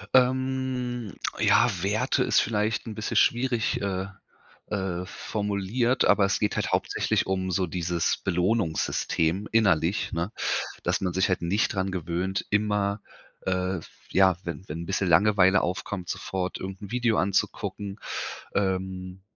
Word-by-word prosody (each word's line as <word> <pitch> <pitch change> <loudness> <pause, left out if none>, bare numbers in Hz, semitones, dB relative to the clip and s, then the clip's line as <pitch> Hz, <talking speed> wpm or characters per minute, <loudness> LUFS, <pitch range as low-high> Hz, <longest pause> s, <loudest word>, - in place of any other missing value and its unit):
Ähm, 130 -3 +1 0.3
ja, - - +5
Werte 110 +7 +1
ist - - +4
vielleicht 110 +1 0
'n 110 - -5
bisschen 110 - -3
schwierig, 120 -2 +2
äh, 95 -1 -2 0.6
äh, 95 -3 -2
formuliert, 105 +6 0
aber 100 - +5
es 100 - +1
geht 105 -1 0
halt - - -1
hauptsächlich - - +1
um 95 -1 -1
so 90 +1 +1
dieses 85 0 0
Belohnungssystem 90 - 0
innerlich, 100 -4 +2
ne, 85 +3 -2 0.5
dass - - 0
man 90 -2 -1
sich 95 +2 +2
halt 95 - 0
nicht 100 +8 +1
dran 95 -1 -1
gewöhnt, 90 +2 -2
immer, 105 -1 +1 0.5
äh, 95 0 0
f 80 - -10 0.2
ja, 95 -1 +5
wenn 85 +2 -6
wenn 85 +3 -4
bisschen 95 - 0
Langeweile 95 +2 +5
aufkommt, 90 0 -3
sofort 95 -1 -3
irgend 95 +1 -6
'n 100 - -8
Video 120 -3 +2
anzugucken 100 +1 -1 0.6
ähm, 95 -1 -2
95 Hz, 135 wpm, -27 LUFS, 90-105 Hz, 0.6 s, ja